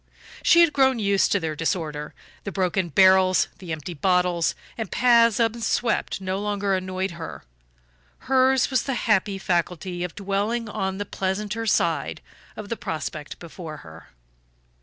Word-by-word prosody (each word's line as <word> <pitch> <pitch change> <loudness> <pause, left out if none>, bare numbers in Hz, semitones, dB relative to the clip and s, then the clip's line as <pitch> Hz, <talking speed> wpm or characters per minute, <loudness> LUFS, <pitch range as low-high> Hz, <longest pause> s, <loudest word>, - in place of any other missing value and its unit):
She 340 - +6
had 335 -3 +4
grown 265 -2 +3
used 200 -3 +2
to 200 - +3
their 160 -3 -3
disorder; 155 -2 -3 0.3
the 200 - -5
broken 185 -1 0
barrels, 185 +2 +5
the 180 -3 -8
empty 160 +2 -5
bottles 180 +1 +1 0.2
and 225 -4 -5
paths 235 -2 +4
unswept 230 -1 0
no 190 0 -3
longer 205 -1 -1
annoyed 185 0 -2
her; 170 -1 -8 0.8
hers 265 0 +3
was 260 - +2
the 270 - -3
happy 205 -2 +2
faculty 175 -1 -2
of 180 - -5
dwelling 205 +4 -1
on 190 -2 -3
the 205 - -3
pleasanter 210 +4 -3
side - - 0 0.4
of 210 -1 -8
the 230 - -3
prospect 155 -1 -5
before 165 -2 -9
her. 80 0 -13
190 Hz, 145 wpm, -24 LUFS, 175-220 Hz, 0.8 s, She